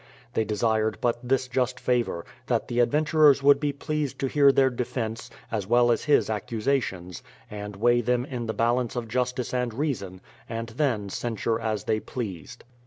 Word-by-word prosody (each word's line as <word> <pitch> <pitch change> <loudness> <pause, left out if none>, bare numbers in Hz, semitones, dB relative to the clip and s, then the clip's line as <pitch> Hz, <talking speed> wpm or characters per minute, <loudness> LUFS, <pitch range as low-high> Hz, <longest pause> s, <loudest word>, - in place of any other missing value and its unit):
They 110 - +1
desired 110 0 0
but 120 -1 0
this 130 +1 0
just 125 0 -1
favour; 120 -9 0 0.2
that 120 -3 0
the 120 0 -1
adventurers 150 +2 +4
would 140 0 +6
be 145 -1 0
pleased 150 0 -3
to 135 - +1
hear 140 0 +5
their 135 -1 +3
defence, 115 -2 -4 0.2
as 105 -4 -2
well 120 +1 +4
as 115 - 0
his 150 - +4
accusations, 110 - -2 0.3
and 105 -1 -6
weigh 120 +4 +3
them 125 +1 0
in 125 -4 -5
the 110 - -2
balance 120 +1 +1
of 120 -2 -3
justice 125 +2 -2
and 125 -3 -1
reason, 110 -10 -3 0.3
and 115 0 -4
then 115 -5 -1
censure 115 +1 -2
as 110 -3 -2
they 110 - 0
pleased. 100 - -7
120 Hz, 175 wpm, -26 LUFS, 110-130 Hz, 0.3 s, would